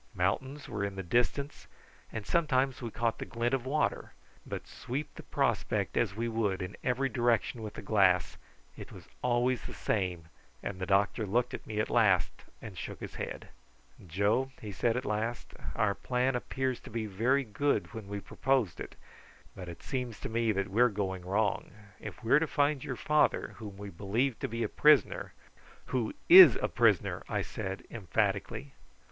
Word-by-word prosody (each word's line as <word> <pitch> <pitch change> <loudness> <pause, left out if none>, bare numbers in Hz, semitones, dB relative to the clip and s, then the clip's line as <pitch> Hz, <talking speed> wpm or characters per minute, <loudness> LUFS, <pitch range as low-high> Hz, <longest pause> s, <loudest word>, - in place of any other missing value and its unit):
Mountains 130 +10 -1
were 100 - -3
in 100 -1 -3
the 95 - -4
distance, 125 - -1 0.4
and 110 -2 -5
sometimes 135 -6 +1
we 120 - -4
caught 115 +1 -1
the - - -3
glint 120 +2 -1
of 130 -1 -1
water; 150 +3 -1 0.3
but - - -5
sweep 140 +4 -5
the - - -9
prospect - - -1
as 105 -5 +1
we 115 +2 -2
would 110 -5 0
in 90 +2 -6
every 130 +2 +1
direction 120 -2 +1
with 105 -1 -7
the - - -7
glass 95 -5 +3 0.4
it - - -10
was - - -12
always 125 0 +1
the - - -8
same, 90 -6 -1 0.4
and 95 -2 -4
the 95 - -3
doctor 100 +3 +2
looked 120 +5 +1
at - - -7
me 110 -1 -3
at 110 - +1
last 105 -7 +3 0.3
and 95 -6 -8
shook - - -6
his - - -7
head. - - -6 0.6
"Joe," 100 +9 +1
he 105 - -7
said 115 +5 0
at 130 - -3
last, 110 +3 -3 0.2
"our 105 -3 +2
plan 125 +4 0
appeared 130 +1 -2
to - - -13
be 115 0 -3
very 120 +8 +1
good 135 +5 -1
when 110 -3 -7
we 100 0 -4
proposed 130 -8 0
it, - - -7 0.6
but 90 -2 -7
it 85 - -10
seems 125 -5 -4
to - - -4
me 115 0 +1
that 100 -1 -1
we 110 +5 +2
are 125 - +6
going 95 -3 -3
wrong. 100 +2 0 0.3
If - - -9
we 115 - -3
are 150 - +8
to 165 - 0
find 145 -2 +1
your 130 - -4
father, 150 +4 +2
whom 105 -3 -8
we 100 0 -7
believe 110 +8 -1
to - - -2
be 115 +1 -3
a - - +1
prisoner 150 -7 +3 0.3
" - - -24
"Who 120 -4 0
is 180 -9 +11
a - - -1
prisoner!" - - +2
I - - 0
said 95 +1 -5
emphatically. 110 +4 -1
115 Hz, 190 wpm, -31 LUFS, 100-130 Hz, 0.6 s, is